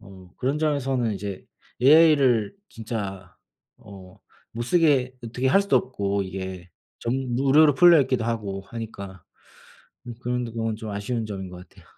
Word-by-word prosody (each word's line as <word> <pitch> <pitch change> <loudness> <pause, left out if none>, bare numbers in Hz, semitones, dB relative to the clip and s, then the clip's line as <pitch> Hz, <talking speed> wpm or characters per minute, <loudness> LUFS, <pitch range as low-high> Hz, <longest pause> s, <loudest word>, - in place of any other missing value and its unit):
어 95 -3 -15
그런 135 +4 -1
점에서는 135 -6 0
이제 100 -1 -6 0.4
AI를 140 -7 +5
진짜 100 -5 -6 0.4
어 95 -3 -14 0.3
못 120 - -4
쓰게 135 -3 +2
어떻게 120 +3 -3
할 170 +10 +4
수도 200 - +2
없고 100 -5 -1
이게 95 -1 -7 0.3
전부 125 +1 -2
무료로 145 +1 +5
풀려 170 +2 +7
있기도 130 -4 0
하고 105 -4 -3
하니까, 100 -5 -8 0.8
음 120 - -7
그런 125 0 -2
부분은 115 -1 -3
좀 110 -1 -7
아쉬운 110 +3 -3
점인 95 -3 -6
것 90 0 -12
같아요. - - -20
115 Hz, 295 characters per minute, -24 LUFS, 100-130 Hz, 0.8 s, 풀려